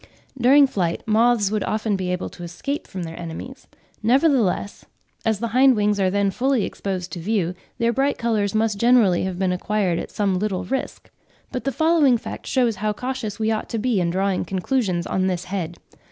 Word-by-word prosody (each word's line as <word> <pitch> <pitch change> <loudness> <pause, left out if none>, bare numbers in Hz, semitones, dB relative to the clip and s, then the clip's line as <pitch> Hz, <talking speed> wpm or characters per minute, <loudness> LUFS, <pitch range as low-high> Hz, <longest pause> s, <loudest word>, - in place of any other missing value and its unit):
During 270 +3 +6
flight, 180 -10 -2
moths 220 -1 +3
would 215 -2 0
often 215 -1 -1
be 185 -1 -2
able 180 0 -2
to - - -13
escape 175 - -4
from 185 -2 -6
their 165 0 -7
enemies; 175 +10 -8 0.3
nevertheless, 240 - +2 0.4
as 220 -2 +2
the 235 +1 -2
hind 260 +2 +5
wings 210 -1 +1
are 190 -1 +3
then 200 0 +1
fully 255 0 +1
exposed 185 -2 -4
to 175 - -5
view, 180 -1 0 0.2
their 235 0 +1
bright 275 +2 +1
colours 215 -4 0
must 215 -2 +1
generally 230 -7 +4
have 185 -2 -3
been 185 -1 +1
acquired 180 -1 0
at - - -6
some 195 -3 0
little 200 -2 -1
risk. 265 +1 -4 0.4
But 250 - -4
the 275 - +1
following 315 -5 +3
fact - - -8
shews 240 -5 +1
how 210 +1 -1
cautious 250 -3 -4
we 220 0 0
ought 220 - -2
to 230 - -2
be 225 -3 +1
in 170 - +1
drawing 190 +2 0
conclusions 190 -2 -1
on 185 0 0
this 180 -1 -1
head. 175 -3 -4
210 Hz, 195 wpm, -22 LUFS, 185-245 Hz, 0.4 s, During